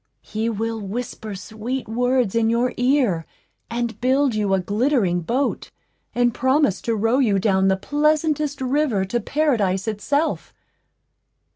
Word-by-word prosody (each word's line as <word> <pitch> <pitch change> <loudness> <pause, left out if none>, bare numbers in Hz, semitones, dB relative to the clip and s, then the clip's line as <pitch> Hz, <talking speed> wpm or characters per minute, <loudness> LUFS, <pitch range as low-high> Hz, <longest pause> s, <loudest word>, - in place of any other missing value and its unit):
He 220 +2 -2
will 225 0 -3
whisper 215 0 -5
sweet 220 +6 -5
words 245 -1 +1
in 230 -1 +2
your 235 +2 +1
ear, 245 - +1 0.4
and 235 0 -3
build 265 +1 +2
you 210 -2 0
a - - +1
glittering 205 -2 +1
boat, 255 +11 -1 0.5
and 240 -1 +2
promise 260 - +2
to 230 - -1
row 225 +5 +2
you 215 -7 +3
down 190 -1 +2
the 190 0 +2
pleasantest 300 +3 0
river 260 -7 +1
to 240 +5 -1
Paradise 225 -8 0
itself. 285 +9 -1
235 Hz, 135 wpm, -22 LUFS, 205-265 Hz, 0.5 s, you